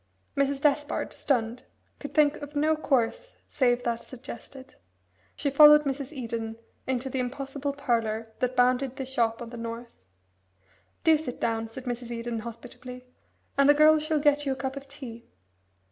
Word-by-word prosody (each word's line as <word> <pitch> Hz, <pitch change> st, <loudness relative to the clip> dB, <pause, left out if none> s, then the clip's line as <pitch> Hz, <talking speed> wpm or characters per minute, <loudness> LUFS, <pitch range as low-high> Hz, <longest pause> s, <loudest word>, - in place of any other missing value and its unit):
Mrs. 280 Hz, 0 st, +1 dB
Despard, 295 Hz, 0 st, +1 dB
stunned, 240 Hz, -3 st, -1 dB, 0.3 s
could 285 Hz, -, -8 dB
think 300 Hz, -1 st, +4 dB
of 290 Hz, 0 st, -9 dB
no 310 Hz, +2 st, +3 dB
course 310 Hz, -, 0 dB, 0.2 s
save 245 Hz, -2 st, +2 dB
that 235 Hz, -1 st, -1 dB
suggested. 260 Hz, +2 st, -10 dB, 0.6 s
She 285 Hz, -, -1 dB
followed 300 Hz, +1 st, +8 dB
Mrs. 275 Hz, 0 st, -3 dB
Eden 230 Hz, -5 st, -4 dB, 0.3 s
into 260 Hz, 0 st, -1 dB
the 265 Hz, 0 st, -2 dB
impossible 275 Hz, +2 st, -3 dB
parlour 225 Hz, -5 st, -1 dB
that 250 Hz, 0 st, 0 dB
bounded 250 Hz, +1 st, +2 dB
the 265 Hz, -, -4 dB
shop 235 Hz, -3 st, 0 dB
on 230 Hz, -, -9 dB
the 240 Hz, -, -7 dB
north. 230 Hz, +1 st, -6 dB, 1.1 s
"Do 320 Hz, -2 st, +5 dB
sit 270 Hz, -6 st, -6 dB
down," 225 Hz, -1 st, -1 dB
said 240 Hz, +3 st, -9 dB
Mrs. 245 Hz, -1 st, -4 dB
Eden 235 Hz, -1 st, -3 dB
hospitably, 250 Hz, +2 st, -9 dB, 0.5 s
"and 280 Hz, 0 st, +6 dB
the 290 Hz, -, +7 dB
girl 310 Hz, +1 st, +6 dB
shall 310 Hz, 0 st, 0 dB
get 290 Hz, 0 st, +3 dB
you 275 Hz, -2 st, 0 dB
a -, -, -6 dB
cup 265 Hz, +1 st, -4 dB
of 275 Hz, 0 st, -8 dB
tea. 255 Hz, -5 st, -10 dB
260 Hz, 160 wpm, -27 LUFS, 235-285 Hz, 1.1 s, followed